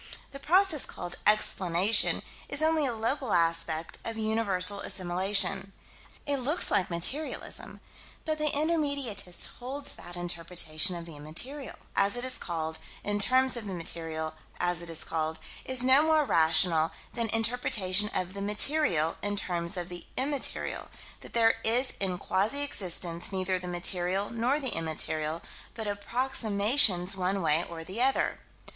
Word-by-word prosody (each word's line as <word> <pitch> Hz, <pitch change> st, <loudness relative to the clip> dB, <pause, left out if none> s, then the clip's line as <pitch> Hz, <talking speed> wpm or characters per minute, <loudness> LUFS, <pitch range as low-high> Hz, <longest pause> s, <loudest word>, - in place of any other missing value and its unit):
The 275 Hz, -, -9 dB
process 355 Hz, -1 st, +3 dB
called 175 Hz, -, -5 dB
"explanation" 200 Hz, -1 st, +2 dB, 0.3 s
is 310 Hz, -, -1 dB
only 315 Hz, -2 st, +2 dB
a 240 Hz, -, -3 dB
local 230 Hz, +2 st, -1 dB
aspect 165 Hz, -1 st, 0 dB
of 225 Hz, -1 st, -5 dB
universal 205 Hz, -3 st, +1 dB
assimilation. 195 Hz, +2 st, 0 dB, 0.5 s
It 285 Hz, -1 st, +1 dB
looks 280 Hz, +7 st, +2 dB
like 190 Hz, -, +1 dB
materialism: 185 Hz, -, -2 dB, 0.4 s
but 310 Hz, -1 st, -2 dB
the 305 Hz, -, +1 dB
intermediatist 280 Hz, -, -1 dB
holds 270 Hz, +3 st, -3 dB
that 175 Hz, -, -10 dB
interpretation 170 Hz, -1 st, +2 dB
of 170 Hz, -1 st, -7 dB
the 165 Hz, -2 st, -11 dB
immaterial, 245 Hz, -, -2 dB, 0.2 s
as 200 Hz, +2 st, +2 dB
it 245 Hz, -, -2 dB
is 255 Hz, 0 st, 0 dB
called, 160 Hz, -2 st, -4 dB, 0.2 s
in 205 Hz, 0 st, -1 dB
terms 255 Hz, +5 st, +5 dB
of 230 Hz, -3 st, -3 dB
the 190 Hz, -, -4 dB
material, 165 Hz, -2 st, -3 dB, 0.3 s
as 175 Hz, -1 st, 0 dB
it 170 Hz, -, -2 dB
is 165 Hz, -, -1 dB
called, 160 Hz, 0 st, -3 dB, 0.3 s
is 260 Hz, -1 st, +1 dB
no 260 Hz, +3 st, +6 dB
more 310 Hz, -1 st, +3 dB
rational 165 Hz, -, +3 dB, 0.2 s
than 235 Hz, -1 st, -1 dB
interpretation 215 Hz, -4 st, +1 dB
of 185 Hz, 0 st, -2 dB
the 200 Hz, -, -6 dB
"material" 205 Hz, -, +2 dB
in 205 Hz, 0 st, -2 dB
terms 175 Hz, -2 st, -1 dB
of 175 Hz, -1 st, -4 dB
the 175 Hz, -1 st, -9 dB
"immaterial": 275 Hz, +1 st, -1 dB, 0.3 s
that -, -, -12 dB
there 225 Hz, -1 st, +3 dB
is 245 Hz, +4 st, +3 dB
in 185 Hz, -2 st, -1 dB
quasi 215 Hz, +12 st, +1 dB
existence 175 Hz, -8 st, -2 dB
neither 185 Hz, -1 st, -1 dB
the 180 Hz, -, -8 dB
material 180 Hz, +2 st, 0 dB
nor 240 Hz, +5 st, 0 dB
the 265 Hz, -4 st, 0 dB
immaterial, 160 Hz, 0 st, -2 dB, 0.3 s
but 225 Hz, -2 st, -5 dB
approximations 205 Hz, -3 st, +2 dB
one 190 Hz, 0 st, -1 dB
way 160 Hz, +1 st, +2 dB
or 165 Hz, -1 st, -7 dB
the 190 Hz, +8 st, -5 dB
other. 265 Hz, +1 st, +1 dB
200 Hz, 150 wpm, -28 LUFS, 175-255 Hz, 0.5 s, no